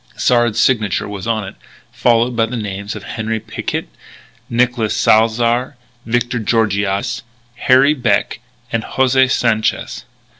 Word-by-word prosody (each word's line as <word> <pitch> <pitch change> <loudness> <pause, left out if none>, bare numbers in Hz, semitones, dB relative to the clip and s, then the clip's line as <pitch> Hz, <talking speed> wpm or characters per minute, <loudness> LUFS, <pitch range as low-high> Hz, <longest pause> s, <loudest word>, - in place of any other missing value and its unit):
Sard's 120 -3 +2
signature 110 -7 +1
was 100 0 -6
on 110 -3 -1
it, - - -9 0.4
followed 120 +1 +2
by 115 -1 +2
the 125 +2 -4
names 100 -1 -5
of 105 - -8
Henri 110 +1 -3
Picquet, - - -4 0.6
Nicolas 120 -2 +1
Salzar, 115 +4 +2 0.3
Victor 120 +1 0
Georgiades, 110 +1 0 0.4
Harry 130 +4 +4
Beck, 120 -8 0 0.3
and 115 - 0
José 130 +1 +2
Sanchez. 115 -4 0
115 Hz, 120 wpm, -17 LUFS, 110-125 Hz, 0.6 s, Harry